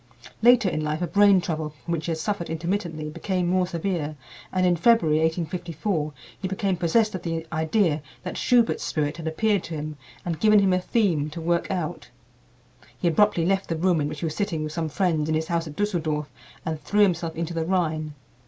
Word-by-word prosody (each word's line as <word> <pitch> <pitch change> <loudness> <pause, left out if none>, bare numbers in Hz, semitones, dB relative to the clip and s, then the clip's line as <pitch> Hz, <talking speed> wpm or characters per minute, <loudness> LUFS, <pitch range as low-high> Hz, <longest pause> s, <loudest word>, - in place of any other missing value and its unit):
Later 240 -2 +6
in 155 -4 -1
life 155 +3 -1
a - - 0
brain 200 +2 +5
trouble 160 -3 -3
from 150 +3 -9
which 160 -1 -2
he - - 0
had 160 - -1
suffered 175 +1 -2
intermittently 165 -1 -2
became 180 +2 -1
more 180 +1 +2
severe, 170 -3 -2 0.4
and 185 -1 +1
in 180 -1 +4
February, 170 -5 +4
1854, 165 0 -1 0.3
he 190 - -1
became 195 0 0
possessed 215 +6 +2
of 185 - -4
the 165 -1 -3
idea 160 0 +1 0.2
that 180 - -5
Schubert's 240 -2 +2
spirit 150 0 -1
had 165 -1 -5
appeared 200 +4 +1
to 165 - -5
him 150 0 -5 0.3
and 170 -3 -2
given 215 -1 +5
him 195 -2 +4
a 185 - +3
theme 180 -9 +1
to 155 - -7
work 170 +1 0
out. 175 -3 -3 0.9
He 175 - 0
abruptly 170 0 +3
left 195 +1 0
the 165 - 0
room 170 -1 +2
in 145 - 0
which 150 0 -6
he - - -1
was 155 -1 -3
sitting 170 -7 -1
with 155 0 -4
some 160 -1 -2
friends 160 -2 0
in 155 - +2
his 160 0 -2
house 170 -1 0
at 150 - -8
Düsseldorf 160 -7 -1 0.4
and 160 -3 -3
threw 210 0 +1
himself 170 -4 +2
into 170 +1 -3
the 165 -1 -1
Rhine. 155 -5 0
170 Hz, 210 wpm, -25 LUFS, 155-190 Hz, 0.9 s, Later